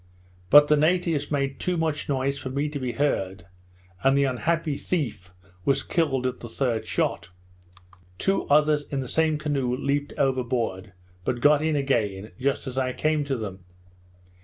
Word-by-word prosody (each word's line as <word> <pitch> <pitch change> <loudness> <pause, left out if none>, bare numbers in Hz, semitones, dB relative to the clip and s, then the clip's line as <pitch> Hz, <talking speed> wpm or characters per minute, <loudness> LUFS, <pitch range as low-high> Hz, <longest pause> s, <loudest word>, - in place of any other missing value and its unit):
But 145 +1 +8
the 150 - +5
natives 160 -2 +1
made 140 -2 -1
too 180 -1 -1
much 160 -3 -1
noise 140 0 0
for 130 - -5
me 140 +3 -1
to 145 -1 -5
be 125 -2 -3
heard, 95 -11 -1 0.6
and 135 +1 +4
the 140 - +4
unhappy 150 +4 0
thief 120 - -3 0.3
was 135 - +1
killed 140 -7 0
at 125 -1 -2
the 120 - -8
third 115 -1 -1
shot. 90 - -1 0.9
Two 195 - 0
others 150 0 +3
in 140 -2 -3
the 130 - -5
same 160 +2 +2
canoe 140 -5 -1
leaped 145 +1 -1
overboard, 120 -7 -1 0.3
but 120 +5 -1
got 145 +3 +5
in 155 0 +1
again 110 -8 -1
just 135 +2 0
as 130 0 -3
I 130 -1 -1
came 155 +1 +1
to 135 -2 -1
them. 95 -4 -6
140 Hz, 165 wpm, -25 LUFS, 125-150 Hz, 0.9 s, But